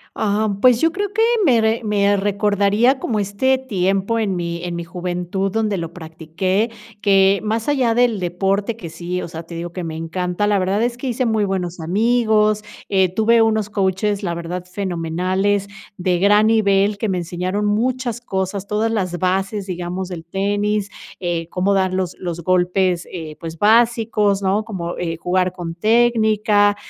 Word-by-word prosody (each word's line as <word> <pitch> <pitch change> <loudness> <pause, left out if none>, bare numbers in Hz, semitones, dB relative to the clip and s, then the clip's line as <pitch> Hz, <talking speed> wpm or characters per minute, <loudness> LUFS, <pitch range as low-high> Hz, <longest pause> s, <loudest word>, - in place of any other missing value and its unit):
Ah, 215 +1 0
pues, 245 0 +5
yo 325 - +3
creo 405 +1 -3
que, 445 - +1 0.2
me 250 -8 +4
re 220 +1 +1
me 205 -1 +2
recordaría 205 +5 +2
como 220 -5 -1
este 205 +7 +1
tiempo, 195 -2 0
en 200 -4 0
mi 170 0 -4
en 175 -1 -4
mi 170 - -4
juventud 180 +2 -3
donde 215 -2 0
lo 165 -2 -5
practiqué 180 +6 -2 0.3
que, 195 -1 +4
más 220 +4 -1
allá 255 -5 +2
del 240 -3 +2
deporte 195 +5 -1
que, 180 -7 -8
sí, 175 +2 -4
o - - -6
sea, 165 0 -7
te 170 +1 -10
digo 170 +1 -5
que 180 0 -5
me 160 -1 -5
encanta, 180 +4 -2
la 205 -1 +2
verdad 190 +3 0
es 240 0 0
que 260 +2 -4
hice 250 +1 -1
muy 220 -2 +1
buenos 180 -3 -3
amigos, 215 +3 +2 0.3
eh, 190 -2 +3
tuve 225 +2 +4
unos 220 -2 +1
coaches, 200 +1 0
la 175 -3 -2
verdad, 170 +1 -5
fenomenales, 185 +2 -1 0.3
de 180 -1 0
gran 205 +3 +4
nivel, 200 -2 +2
que 220 - -2
me 185 -2 0
enseñaron 180 +4 -2
muchas 240 +3 -1
cosas, 190 -3 -3
todas 215 +2 0
las 185 -6 -2
bases, 195 +2 -1
digamos, 180 0 -4
del 170 -3 -7
tenis, 205 +3 -1 0.3
eh, 170 -2 -2
cómo 190 +2 +1
dar 190 -1 +1
los 185 -1 -2
los 175 -2 -4
golpes, 180 0 +1
eh, 160 -4 -7
pues, 165 -1 -7
básicos, 220 -2 +3
¿no?, 195 +3 +1
como, 175 -6 -5
eh, 165 -2 -2
jugar 180 +2 0
con 170 -2 -6
técnica. 215 -1 +3
195 Hz, 175 wpm, -20 LUFS, 180-215 Hz, 0.3 s, pues